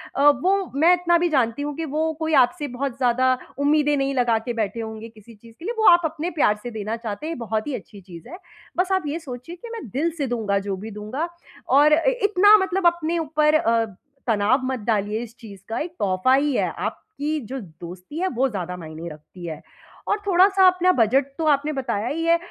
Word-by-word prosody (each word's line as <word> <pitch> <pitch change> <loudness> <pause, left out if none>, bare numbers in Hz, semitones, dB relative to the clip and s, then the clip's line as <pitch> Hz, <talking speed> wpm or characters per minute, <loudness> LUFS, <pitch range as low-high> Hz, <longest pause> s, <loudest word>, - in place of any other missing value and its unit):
अ, 285 +2 +6
वो 385 0 +1
मैं 330 +5 +5
इतना 345 -1 +3
भी 350 0 +1
जानती 255 -2 +1
हूँ 295 0 -4
कि 325 - -3
वो 315 +2 -1
कोई 320 0 -1
आपसे 290 +4 -7
बहुत 270 -1 -3
ज़्यादा 255 0 +2 0.2
उम्मीदें 295 0 +3
नहीं 275 0 0
लगा 240 -3 +2
के 240 - -1
बैठे 220 0 -2
होंगे 220 +1 -7
किसी 220 +1 -16
चीज़ 230 +2 -17
के 335 - -10
लिए, 465 - -2
वो 440 - +4
आप 345 0 +6
अपने 320 +2 -3
प्यार 210 -6 +4
से 245 - -5
देना 215 +1 -4
चाहते 230 -2 -6 0.2
हैं, 330 - -3
ये - - -7
बहुत 220 +1 -2
ही 285 - -3
अच्छी 205 -2 -10
चीज़ 175 -3 -12
है। 355 - -8 0.4
बस 365 +2 +1
आप 375 -2 +2
ये 315 +4 -3
सोचिए 265 +3 -8
कि 460 +7 -11
मैं 445 - -7
दिल 290 +10 0
से 285 - -1
दूँगा, 220 -5 -1
जो 195 0 -3
भी 215 +3 -8
दूँगा 215 +10 -4 0.5
और 300 +1 +6
इ 335 +11 +3
इतना 410 +1 +6
मतलब 380 -1 -1
अपने 340 0 0
ऊपर 305 -1 +1 0.2
अ, 230 -1 +2 0.4
तनाव 220 +4 +2
मत 260 -1 -2
डालिए 215 -1 0
इस 230 0 -11
चीज़ 205 -5 -11
का। 225 - -2
एक 340 +3 -4
तोहफ़ा 190 +6 +2
ही 285 0 +1
है, - - +1
आपकी 310 -7 -4
जो 265 0 -4
दोस्ती 180 - -10
है, 375 - +1
वो 270 -4 +1
ज़्यादा 180 -4 -4
मायने 160 0 -8
रखती 155 +4 -12
है। 155 -2 -6 0.5
और 410 - +1
थोड़ा-सा 380 +1 +5
अपना 365 0 +4
बजट 255 +5 +3
तो 325 - -2
आपने 295 +1 +2
बताया 245 -5 -2
ही 330 +4 -2
है 335 0 +4
270 Hz, 225 wpm, -23 LUFS, 220-330 Hz, 0.5 s, अ